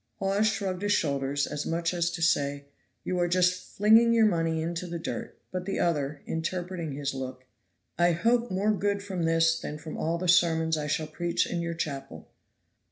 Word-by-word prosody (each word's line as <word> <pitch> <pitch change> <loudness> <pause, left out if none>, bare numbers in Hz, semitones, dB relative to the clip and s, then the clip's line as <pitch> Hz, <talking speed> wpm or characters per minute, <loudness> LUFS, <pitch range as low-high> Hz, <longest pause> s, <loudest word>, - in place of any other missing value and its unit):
Hawes 195 +2 +1
shrugged 195 -4 -2
his 205 0 +2
shoulders, 140 -2 0
as 150 0 -4
much 170 +1 -1
as 170 -1 +1
to 170 -1 -4
say, 140 -3 +1 0.4
"You 180 -1 -1
are 175 - +2
just 180 +1 +1
flinging 225 +3 +6
your 225 -1 +5
money 165 -5 +1
into 170 +2 -3
the 170 0 -4
dirt;" 165 - -5
but 185 0 -4
the 195 - -2
other, 145 -4 -1
interpreting 170 -1 -3
his 140 0 -3
look, 130 -1 -6 0.5
said: - - +4
"I - - +4
hope 235 +7 +2
more 195 +3 +1
good 200 0 0
from 185 -4 -2
this 165 0 +3
than 150 - -5
from 155 +1 -8
all 165 +2 -1
the 180 +1 -3
sermons 165 -2 +4
I 150 -1 -3
shall 155 +1 0
preach 170 +2 -1
in 170 - -3
your 170 0 -3
chapel." 135 - -5
170 Hz, 195 wpm, -28 LUFS, 155-185 Hz, 0.5 s, flinging